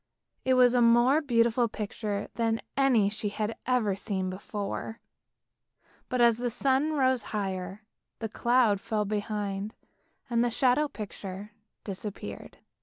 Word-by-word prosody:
It 260 0 +3
was 250 -1 +6
a 245 - +4
more 240 +5 +5
beautiful 235 -3 +2
picture 210 -1 -4
than 225 -1 0 0.2
any 255 -7 +4
she 210 0 -2
had 215 +2 -3
ever 235 -6 +2
seen 190 -2 -3
before, 205 +3 -5 1.1
but 255 - -1
as 235 -2 +5
the 245 0 -1
sun 275 +5 +1
rose 260 -5 +2
higher, 190 0 -4 0.3
the 225 - -3
cloud 235 -2 +2
fell 215 -1 -1
behind, 205 0 -3 0.5
and 235 -1 +2
the 245 - +2
shadow 255 +5 +2
picture 205 -3 -7 0.3
disappeared. 200 0 -7
225 Hz, 130 wpm, -28 LUFS, 205-245 Hz, 1.1 s, was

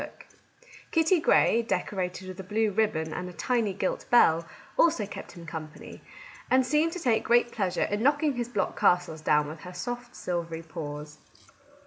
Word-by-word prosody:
Kitty 325 +2 +3
Grey, 235 -7 +4
decorated 185 -4 -3
with 185 0 -8
a - - -5
blue 215 +3 0
ribbon 190 -7 0
and 180 0 -4
a - - -10
tiny 225 +5 0
gilt 190 0 -3
bell, 165 -8 +5 0.3
also 315 -11 +3
kept 200 - -9
him 170 -1 -11
company, 155 -2 -8 0.5
and 260 0 +4
seemed 300 +5 +2
to 360 - -5
take 240 -8 +1
great 240 0 +3
pleasure 190 -6 -1
in 205 +1 -1
knocking 290 +3 +2
his 240 -1 -3
block 205 -6 -2
castles 175 -3 +2
down 150 -1 +2
with 155 +2 -8
her 180 +3 -10
soft 245 +6 -5
silvery 170 -2 -4
paws. 150 -2 -7
195 Hz, 165 wpm, -28 LUFS, 165-240 Hz, 0.5 s, bell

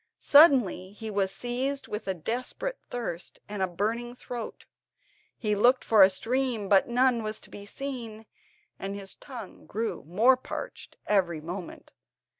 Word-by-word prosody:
Suddenly 260 - +5
he 220 +1 -6
was 195 -2 0
seized 260 +5 -2
with 210 0 -5
a 190 - 0
desperate 245 - -4
thirst, 205 -8 -5
and 205 -1 -5
a 190 - +2
burning 215 +7 -1
in 240 - -10
his - - -23
throat. 240 -3 -7 0.7
He 210 -3 0
looked 245 +5 +4
for 220 -3 +5
a 190 - +9
stream 230 +2 -1
but 195 -1 +5
none 245 0 +3
was 215 0 -4
to - - -14
be 205 0 -10
seen, 230 -4 -6 0.5
and 195 +1 -4
his 195 -1 -5
tongue 240 -8 -10
grew 225 +3 -3
more 230 +10 +4
parched 255 - -7
every 180 -6 +1
moment. 175 +3 -8
220 Hz, 160 wpm, -28 LUFS, 195-245 Hz, 0.7 s, a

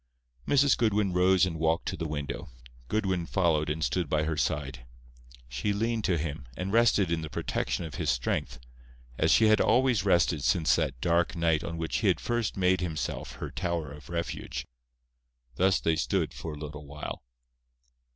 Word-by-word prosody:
Mrs. 140 -1 +4
Goodwin 105 -4 +1
rose 95 +1 +4
and 80 -3 -4
walked 80 +1 +1
to - - -3
the 80 - -4
window. 75 -2 -5 0.4
Goodwin 95 - -1
followed 80 -5 +1
and 80 +1 -2
stood 90 -3 0
by 75 +1 +1
her 80 0 -1
side. 70 -4 -2 0.6
She 65 +12 -2
leaned 115 +1 -1
to 90 - +2
him, 75 -4 -4
and 95 +2 -3
rested 110 -6 +4
in 85 -1 0
the 80 - -6
protection 85 - -2
of 80 - -8
his 75 - 0
strength, - - -1 0.6
as - - +3
she 110 - +5
had 110 0 +5
always 120 -3 +3
rested 85 -6 +2
since 80 +6 +3
that 65 -2 -1
dark 85 0 +1
night 80 -2 +1
on 85 0 -5
which 80 0 -2
he - - 0
had - - +3
first 120 -4 -2
made 95 -1 +2
himself 80 -4 -3
her - - -6
tower 85 -5 -2
of 75 +1 -12
refuge. 85 0 -4 0.9
Thus 95 +1 +3
they 80 - +1
stood 85 -1 0
for 80 - -6
a - - -8
little 75 -1 -8
while. 75 +1 -6
85 Hz, 180 wpm, -28 LUFS, 75-95 Hz, 0.9 s, she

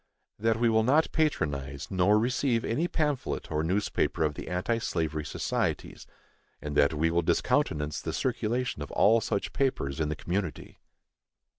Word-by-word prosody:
That 110 +1 +2
we 120 - +3
will 110 -1 +4
not 145 +8 +3
patronize 70 - -1
nor 95 +3 +4
receive 120 +1 +1
any 155 +10 0
pamphlet 150 -6 -2
or 75 0 0
newspaper 90 0 0
of 75 -1 +1
the - - -8
anti 90 +7 -1
slavery 80 -7 -2
societies, - - -3 0.5
and 75 -1 -5
that 75 +1 +4
we 80 +2 +1
will 85 +1 +2
discountenance 75 -2 0
the - - -3
circulation 125 0 -1
of - - -5
all 115 +2 +5
such 100 - -2
papers 80 - -1
in 75 -1 0
the 75 - -2
community. 90 +1 -4
100 Hz, 155 wpm, -28 LUFS, 75-120 Hz, 0.5 s, all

